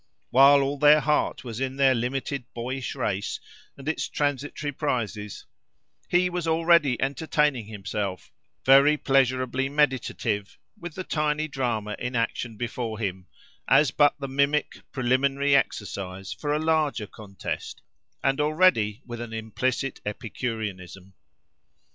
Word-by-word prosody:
While 140 +2 +7
all 140 +1 -2
their 150 +1 +7
heart 150 -4 0
was 115 -2 -6
in 135 0 -2
their 135 -1 +4
limited 130 +1 -3
boyish 125 +3 -4
race, 100 -6 -2 0.4
and 135 +1 -11
its 160 - -1
transitory 145 +1 -2
prizes, 115 - -3 0.6
he 180 +1 +3
was 175 -2 -3
already 165 -5 +3
entertaining 140 -3 0
himself, 100 -3 -5 0.3
very 140 +3 +6
pleasurably 130 -1 +1
meditative, 130 -7 0 0.2
with 175 -2 -9
the 185 - -4
tiny 150 -2 -1
drama 120 -7 -2
in 125 0 -4
action 115 -1 -2
before 120 -1 -4
him, 95 -4 -4 0.4
as 150 -5 +5
but 145 0 +4
the 140 - -4
mimic, 140 +2 0
preliminary 135 +2 +2
exercise 95 -6 -2
for 145 - -4
a 150 - +2
larger 155 -7 +1
contest, 100 -2 -7 0.4
and 135 +2 +2
already 150 - +2
with 120 -1 -7
an 115 -1 -7
implicit 125 +4 -2
epicureanism. 105 -4 -5
130 Hz, 125 wpm, -26 LUFS, 110-145 Hz, 0.6 s, While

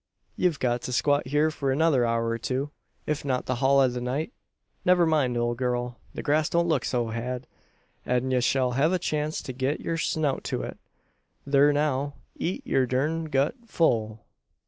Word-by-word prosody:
Ye've 180 -5 +1
got 120 -1 0
to 125 - -4
squat 145 +1 +2
hyur 150 +3 +2
for 140 -3 -1
another 140 -4 +3
hour 115 0 0
or 115 0 -2
two 135 +5 -2 0.3
if 150 -1 -2
not 130 -3 -1
the 130 - -1
hul 135 +2 +4
o' 135 - +5
the 125 0 -3
night. 140 - -2 0.5
Never 180 -1 +5
mind, 145 -7 +2
ole 120 0 +1
gurl! 125 -1 -2 0.2
The - - -5
grass 150 +1 +2
don't 170 0 +2
look 160 - +1
so 120 -3 0
had; 125 +3 -4 0.6
an 125 +1 0
ye 125 -1 +2
shell 125 0 +2
hev 140 +7 +2
a - - +3
chance 155 -3 -2
to 130 - -6
git 130 +4 -1
yur 165 - -2
snout 155 -4 0
to - - -2
it. - - -7 0.7
Thur 140 +1 +5
now 145 -1 0 0.2
eet 180 - -3
your 130 -1 +2
durned 155 +5 -1
gut 140 +2 +2
full!" 110 - +1
135 Hz, 190 wpm, -26 LUFS, 125-150 Hz, 0.7 s, o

